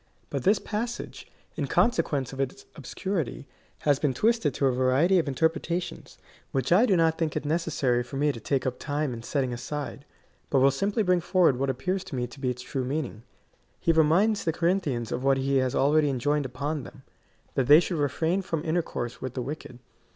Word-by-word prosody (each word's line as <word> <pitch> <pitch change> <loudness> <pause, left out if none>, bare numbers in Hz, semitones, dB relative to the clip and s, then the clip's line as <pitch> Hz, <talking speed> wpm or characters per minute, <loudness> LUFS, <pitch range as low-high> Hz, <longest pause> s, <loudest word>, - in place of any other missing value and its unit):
But 140 - -2
this 200 - +4
passage, 230 +3 -5 0.2
in 145 -3 -2
consequence 150 - +1
of 135 - -8
its 135 -1 -3
obscurity, 155 0 -4 0.4
has 145 -2 +2
been 140 -4 0
twisted 225 - +2
to 140 - +1
a 135 - +4
variety 130 +9 +3
of 160 - -1
interpretations, 165 +4 -2 0.3
which 135 +1 -1
I 210 +8 +6
do 195 - +4
not 165 -1 +2
think 160 -3 -1
it - - -2
necessary 145 -6 +1
for 120 +3 -6
me 145 +1 +2
to 120 - -8
take 135 +3 -1
up 125 -1 -2
time 145 -2 -2
in 115 - -7
setting 130 0 -1
aside, 140 +3 -5 0.5
but 140 - +2
will 135 +1 +5
simply 200 - 0
bring 180 -2 +2
forward 175 -6 +3
what 135 0 0
appears 180 +9 -1
to - - -6
me 125 -1 -1
to 120 +3 -12
be 130 -2 -1
its 125 0 -4
true 130 +1 -3
meaning. 130 -4 -3 0.6
He 165 - +2
reminds 175 +7 +3
the 165 - +1
Corinthians 160 - 0
of 125 - -2
what 135 0 +3
he 135 +1 +1
had 130 -1 +1
already 150 +2 +3
enjoined 145 +2 0
upon 145 +4 -3
them 130 +1 -12 0.3
— - - -37
that 130 - 0
they 150 +2 +9
should 175 -2 -2
re 145 -1 +2
frain 170 +7 0
from 165 -4 -3
intercourse 160 -7 -2
with 130 -2 -5
the 125 - -2
wicked. 140 -3 -7
145 Hz, 205 wpm, -27 LUFS, 130-170 Hz, 0.6 s, they